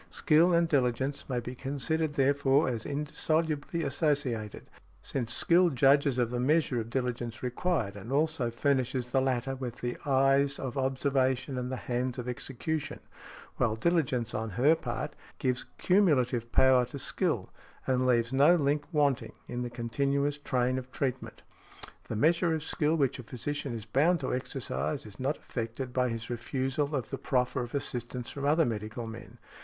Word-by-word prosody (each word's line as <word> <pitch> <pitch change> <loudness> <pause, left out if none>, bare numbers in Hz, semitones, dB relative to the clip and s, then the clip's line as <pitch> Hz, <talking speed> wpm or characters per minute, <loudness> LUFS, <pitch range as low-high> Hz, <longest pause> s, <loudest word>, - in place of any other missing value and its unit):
Skill 170 0 +4
and 170 0 +3
diligence 135 -1 0
may 125 -2 0
be 125 +1 -6
considered, 145 +4 -2
therefore, 140 +1 +3
as 115 -4 -2
indissolubly 155 +2 -1
associated, 140 -7 -1 0.4
since 120 -4 -2
skill 175 +7 +4
judges 140 0 +4
of 120 -2 +1
the 125 - -2
measure 140 -1 +2
of 115 0 -5
diligence 120 -2 -3
required 125 - -1
and 105 +5 -8
also 150 -3 +1
furnishes 125 0 0
the 135 - +3
latter 130 0 0
with 125 -3 -5
the 120 0 -3
eyes 135 0 +3
of 130 -2 -5
observation 130 -1 0
and 125 0 -3
the - - -1
hands 125 0 -2
of 125 -1 -5
execution; 135 +5 -3 0.6
while 110 -3 +1
diligence 125 -5 0
on 110 +1 -2
her 125 - +4
part 120 -8 -4 0.2
gives 125 -1 -1
cumulative 130 - +2
power 130 -1 +5
to 125 +3 -7
skill, 135 - -1 0.3
and 130 0 +1
leaves 120 0 +2
no 145 +6 +6
link 145 -2 +1
wanting 145 -5 +1
in 120 - -4
the 120 - -3
continuous 140 +5 -1
train 130 -2 0
of 130 0 -11
treatment. 130 -1 -3 0.6
The - - -4
measure 165 - +3
of 155 - -4
skill 155 0 0
which 135 -4 +1
a - - -7
physician 135 +2 -4
is 110 -2 -6
bound 150 +10 +3
to 130 - -2
exercise 75 - -2
is 105 -1 -11
not 135 +4 -1
affected 120 +2 -5
by 125 -1 +2
his 115 -1 -4
refusal 135 +4 -1
of 130 -5 -3
the - - -4
proffer 125 0 0
of 120 +2 -5
assistance 125 -2 -3
from 140 -1 -5
other 155 +3 +4
medical 110 +1 -4
men. 115 +1 -9
130 Hz, 165 wpm, -30 LUFS, 120-145 Hz, 0.6 s, no